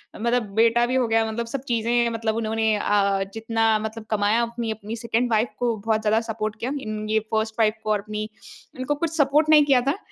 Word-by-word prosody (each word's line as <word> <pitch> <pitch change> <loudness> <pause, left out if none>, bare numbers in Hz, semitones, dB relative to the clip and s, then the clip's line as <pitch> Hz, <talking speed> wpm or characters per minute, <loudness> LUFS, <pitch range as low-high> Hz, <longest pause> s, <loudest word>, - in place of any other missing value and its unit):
मतलब 235 +2 0
बेटा 230 +1 +4
भी 255 +2 -2
हो 255 -2 +2
गया 225 0 +2
मतलब 235 +1 -3
सब 255 +2 -4
चीज़ें 235 0 +1
मतलब 225 -1 -2
उन्होंने 220 -1 0
अ, 200 -1 +1
जितना 225 0 0
मतलब 220 0 -6
कमाया 210 +2 +2
अपनी 235 -1 -3
अपनी 220 +1 -6
सेकंड 235 +1 -1
वाइफ़ 220 +2 +2
को 240 -2 +1
बहुत 215 +1 0
ज़्यादा 220 +1 +2
सपोर्ट 215 -1 -3
किया। 250 - -3
इन 215 -2 -5
ये 220 - +3
फ़र्स्ट 220 0 0
वाइफ़ 215 -1 +3
को 215 - -1
और 210 - +2
अपनी, 215 +1 -5 0.5
इनको 275 +3 -1
कुछ 325 +2 -3
सपोर्ट 295 +2 +3
नहीं 300 -2 +7
किया 265 -3 +4
था। 280 +8 -1
225 Hz, 215 wpm, -23 LUFS, 215-240 Hz, 0.5 s, नहीं